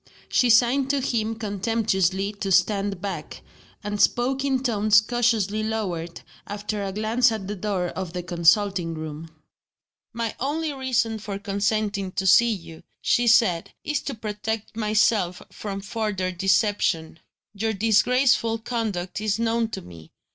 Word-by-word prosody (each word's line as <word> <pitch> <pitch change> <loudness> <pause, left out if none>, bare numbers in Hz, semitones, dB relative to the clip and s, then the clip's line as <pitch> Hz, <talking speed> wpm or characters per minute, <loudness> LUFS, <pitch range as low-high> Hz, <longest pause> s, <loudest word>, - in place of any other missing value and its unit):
She 250 - +3
signed 250 +4 +4
to 280 0 +2
him 225 -3 -1
contemptuously 200 -2 0
to 195 -2 -2
stand 195 +1 +2
back 180 -7 -6 0.4
and 205 0 -2
spoke 260 +3 +2
in 270 -2 0
tones 215 -3 +4
cautiously 215 -2 0
lowered, 185 -7 -3 0.3
after 205 0 -4
a 195 - -3
glance 220 +4 +2
at 215 -4 -4
the 210 - -3
door 190 -3 -2
of 185 -2 -6
the 180 -1 -4
consulting 175 0 +2
room. 155 +1 -7 0.8
"My 230 -1 -3
only 300 +3 -1
reason 245 -4 0
for 205 -2 -5
consenting 200 -1 -1
to 190 -2 -2
see 235 +5 +6
you," 165 -6 -7 0.2
she 240 0 +2
said, 220 -7 +3
"is 295 -1 -1
to 275 - -5
protect 215 0 -4
myself 215 -4 +1
from 200 -2 -6
further 195 -2 -2
deception. 190 -3 +1 0.3
Your 220 +2 -1
disgraceful 225 +2 +3
conduct 215 -5 -3
is 215 -1 0
known 230 0 +1
to - - -5
me. 85 -2 -13
210 Hz, 140 wpm, -24 LUFS, 190-230 Hz, 0.8 s, see